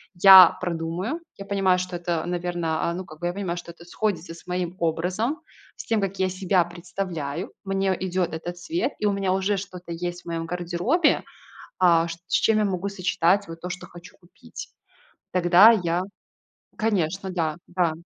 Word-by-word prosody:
я 185 -1 +9
продумаю. 175 - -3 0.2
Я 195 - -8
понимаю, 195 -2 +2
что 185 0 -4
это, 170 -2 -2
наверно, 175 -2 -2
а, - - -2
ну, 185 - -5
как 155 -1 -13
бы 175 - -2
я 175 - -2
понимаю, 185 -3 -3
что 175 0 -8
это 170 0 -16
сходится 180 -3 -3
с - - -16
моим 180 -1 -3
образом, 180 - -1 0.4
с - - -9
тем 225 -2 +1
как 195 0 -3
я 190 0 +2
себя 185 -1 +1
представляю. 175 -2 -5
Мне 195 -1 0
идет 185 -2 -1
этот 175 +2 -5
цвет, 325 - -2
и 210 - -1
у - - +3
меня 195 -2 0
уже 195 +1 0
что 185 -2 -7
есть 175 +1 -5
в - - -40
моём 165 -1 -3
гардеробе, 180 - +1 0.6
а, 170 -2 +4
с 170 +3 -10
чем 220 -1 +3
я 215 - +2
могу 195 0 -1
сочетать 185 0 +1
вот 165 0 -9
то, 180 - -5
что 185 - -6
хочу 175 0 -14
купить. 175 -2 -12 0.6
Тогда 180 +5 +7
я 175 -4 0 0.7
Конечно, 190 -3 -1
да. 160 -4 -1
Да. 175 -2 +1
180 Hz, 180 wpm, -24 LUFS, 170-195 Hz, 0.7 s, я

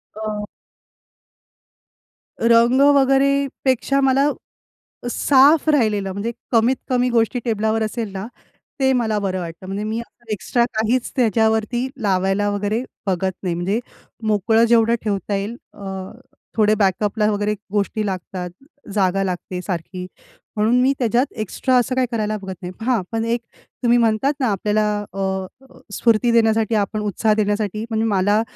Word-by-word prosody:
हं. 215 -1 -4 2.0
रंग 235 +3 +5
वगैरे 270 0 +4 0.4
पेक्षा 265 +1 +2
मला 270 +2 +3 0.8
साफ 285 +5 +4
राहिलेलं, 210 -9 +2
म्हणजे 205 +5 -3 0.2
कमीत 235 +2 +3
कमी 250 -1 +2
गोष्टी 235 +1 +1
टेबलावर 220 0 0
असेल 215 -1 -3
ना, 190 +1 -5 0.5
ते 265 -1 +3
मला 225 -4 +1
बरं 190 -2 -2
वाटतं. 170 +1 -7
म्हणजे 195 +2 -3
मी 220 +2 -2
असं 235 -1 -11
एक्स्ट्रा 235 +4 +1
काहीच 230 +3 0
त्याच्यावरती 225 +1 +1
लावायला 195 0 +1
वगैरे 205 +4 -1 0.2
बघत 190 0 0
नाही. 175 -2 -1
म्हणजे 190 +6 -1 0.5
मोकळं 220 +2 +3
जेवढं 230 0 +4
ठेवता 200 -1 -1
येईल 205 +4 -3 0.2
अ, 190 -1 -6 0.5
थोडे 215 0 +4
बॅकअपला 210 +1 +1
वगैरे 205 +1 0 0.2
गोष्टी 210 +1 -1
लागतात, 185 -1 -4 0.4
जागा 195 -1 +1
लागते 180 0 -4
सारखी, 180 0 -5 0.5
म्हणून 220 +4 +3
मी 270 +2 +3
त्याच्यात 240 +2 +2 0.2
एक्स्ट्रा 255 +5 0
असं 250 +1 +1
काही 255 -1 +1
करायला 215 -2 -1
बघत 190 -2 -7
नाही. 180 0 -5
हां, 250 -5 +2
पण 225 0 -1
एक 235 +1 0 0.4
तुम्ही 240 0 +4
म्हणतात 230 +5 +2
ना 255 - +1
आपल्याला 210 +2 +1 0.3
अ, 190 -1 -2 0.5
स्फूर्ती 235 +2 +2
देण्यासाठी 225 -1 +3
आपण 210 +1 0
उत्साह 210 +1 +1
देण्यासाठी 210 0 -1
म्हणजे 225 0 0
मला 205 +1 +2
215 Hz, 140 wpm, -21 LUFS, 200-235 Hz, 2.0 s, रंग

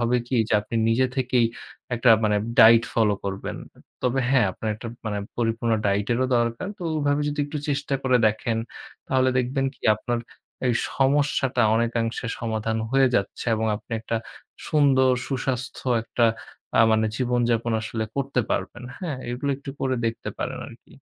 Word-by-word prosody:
হবে 120 +1 +2
কি 130 - 0
যে - - +1
আপনি 105 +2 -5
নিজে 120 +3 +3
থেকেই 125 -2 +2 0.5
একটা 120 +1 +4
মানে 105 -1 +2 0.2
diet 115 +1 +8
follow 105 -3 +3
করবেন। 100 -1 -4 0.5
তবে 130 +1 +1
হ্যাঁ, 130 -6 +4
আপনার 110 - -4
একটা 115 +2 -7 0.2
মানে 105 -1 -2 0.2
পরিপূর্ণ 115 0 0
diet 100 +1 +1
এরও 130 +2 +1
দরকার। 120 +9 -1
তো - - -8
ওইভাবে 145 -1 +1
যদি 145 0 -2
একটু 150 +1 -4
চেষ্টা 140 -1 -1
করে 130 -1 +3
দেখেন, 110 +1 -2 0.5
তাহলে 130 0 +3
দেখবেন 135 +2 0
কি - - -30
আপনার 120 +3 -2 0.5
এই 125 - +3 0.2
সমস্যাটা 135 -2 +2
অনেকাংশে 115 0 -1
সমাধান 110 -1 -2
হয়ে 135 0 +4
যাচ্ছে। 100 - -3
এবং 110 0 -1
আপনি 115 - -12
একটা 115 +1 -2 0.5
সুন্দর 135 -4 +4 0.2
সুস্বাস্থ্য 130 -1 -3 0.2
একটা 120 0 +2 0.5
আ - - +8
মানে 110 0 +3
জীবনযাপন 120 -2 +1
আসলে 110 0 -3
করতে 135 -2 0
পারবেন, 120 - -2 0.2
হ্যাঁ? 160 -8 -3
এগুলো 125 +4 -2
একটু 140 0 -8
করে 130 -1 0
দেখতে 115 0 -3
পারেন - - -3
আর - - -12
কি। - - -19
120 Hz, 160 wpm, -24 LUFS, 115-135 Hz, 0.5 s, diet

